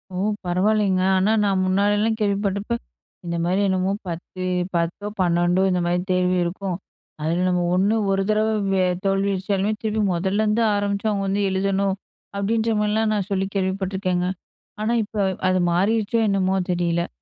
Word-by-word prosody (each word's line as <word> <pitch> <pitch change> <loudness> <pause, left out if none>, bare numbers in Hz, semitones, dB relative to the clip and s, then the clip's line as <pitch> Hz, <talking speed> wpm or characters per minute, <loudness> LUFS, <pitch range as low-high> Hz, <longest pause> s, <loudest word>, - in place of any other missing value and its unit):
ஓ! - - -3 0.3
பரவாயில்லங்க. 190 +1 +2 0.2
ஆனா 195 +3 +2
நான், 195 -2 +2
முன்னாடிலாம் 205 +4 +2
கேள்விப்பட்டப்ப, 200 +1 -1 0.5
இந்த 170 0 -3
மாரி 185 +3 +1
என்னமோ 190 +1 +1
10, 175 +2 -6 0.3
10 170 +5 -1
12, 175 +1 +2
இந்த 180 - +1
மாரி 175 +1 +1
தேர்வு 180 0 +2
இருக்கும். 180 +1 -3 0.4
அதுல 170 +4 0
நம்ம 180 -1 +1
1, 200 +4 +2 0.2
ஒரு 195 0 +1
தடவ 215 +1 +2 0.6
தோல்வி 195 +1 +1
அடைஞ்சாலுமே 195 +2 0
திருப்பி 215 0 0
முதல்லருந்து 210 +5 +1
ஆரம்பிச்சு, 205 +1 -1
அவங்க 195 -1 -1
வந்து 200 +1 0
எழுதணும். 195 0 0 0.4
அப்டின்ற 225 +3 +1
மாரிலா, 210 +1 +1
நான் 200 -3 -1
சொல்லி 190 0 0
கேள்விப்பட்டுருக்கேங்க. 190 -1 -1 0.5
ஆனா, 225 +2 +1
இப்ப 215 +1 -9 0.3
அது 185 0 +2
மாறிருச்சோ, 215 +5 +1
என்னமோ 190 -1 +1 0.2
தெரியல. 170 -1 0
195 Hz, 140 wpm, -22 LUFS, 185-205 Hz, 0.6 s, பரவாயில்லங்க